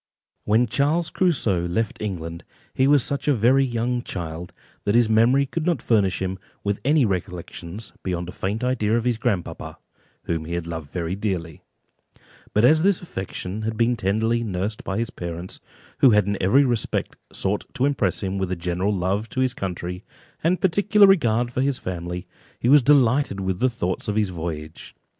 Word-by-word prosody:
When 110 +4 +4
Charles 145 +8 0
Crusoe 110 - +1
left 110 +5 -2
England, 85 -5 -5 0.3
he 130 - +3
was 145 -3 +5
such 140 +1 -3
a 145 - +4
very 125 +5 +4
young 120 -1 -1
child, 85 -5 -6 0.3
that 100 - +1
his 120 -1 +5
memory 115 +6 +4
could 160 +4 -3
not 170 -4 +1
furnish 95 -5 +1
him 95 0 -3 0.2
with 100 -1 -1
any 145 -1 +4
recollections 90 +1 -5
beyond 90 -2 -3
a - - -6
faint 100 +6 -3
idea 115 -3 +1
of 120 - -1
his 120 -2 0
grandpapa, 95 -6 -3 0.5
whom 80 -2 -2
he 85 +2 -3
had 85 -1 -3
loved 80 -4 -6
very 85 0 -2
dearly; 90 -6 -3 0.9
but 105 +3 +3
as 155 +5 +5
this 195 0 +3
affection 95 - -5
had 110 0 -3
been 120 +2 +2
tenderly 110 +3 0
nursed 100 +1 -3
by 95 - -3
his 115 0 -2
parents, 85 +1 -6 0.4
who 135 - +7
had 105 -3 +4
in 100 0 -1
every 130 +10 +4
respect 120 -4 -1 0.2
sought 100 +2 -1
to 135 -2 +1
impress 110 -10 0
him 95 0 -2
with 95 -1 -2
general 90 +3 -1
love 100 +3 -1
to 130 - -4
his 130 -1 +2
country, 90 -3 -5 0.4
and 175 +3 +2
particular 200 +3 +5
regard 120 - +3
for 130 - 0
his 135 -1 +1
family, 90 0 -5 0.3
he 120 - +1
was 145 +1 +8
delighted 130 -5 +3
with 95 -1 -2
the 130 - +3
thoughts 95 -5 -3
of 105 - -1
his 105 -2 +1
voyage. 80 -3 -6
105 Hz, 180 wpm, -23 LUFS, 90-125 Hz, 0.9 s, was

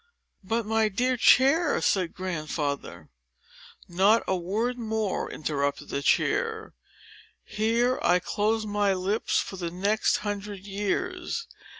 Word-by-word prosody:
"But, 225 +3 -1
my 220 0 +2
dear 250 +6 0
chair—" 280 +6 +4
said 185 -4 0
Grandfather. 150 - -4 0.8
"Not 195 +6 +3
a 190 - +1
word 215 +8 -2
more," 220 -3 -2
interrupted 145 -2 -2
the 140 - -2
chair; 445 - 0 0.7
"here 230 +4 0
I 175 - +4
close 215 +4 -1
my 205 -2 +1
lips 195 +4 0
for 190 - -2
the 175 -2 -3
next 200 +5 +1
hundred 205 -1 -5
years. 350 - -3
205 Hz, 115 wpm, -27 LUFS, 185-230 Hz, 0.8 s, chair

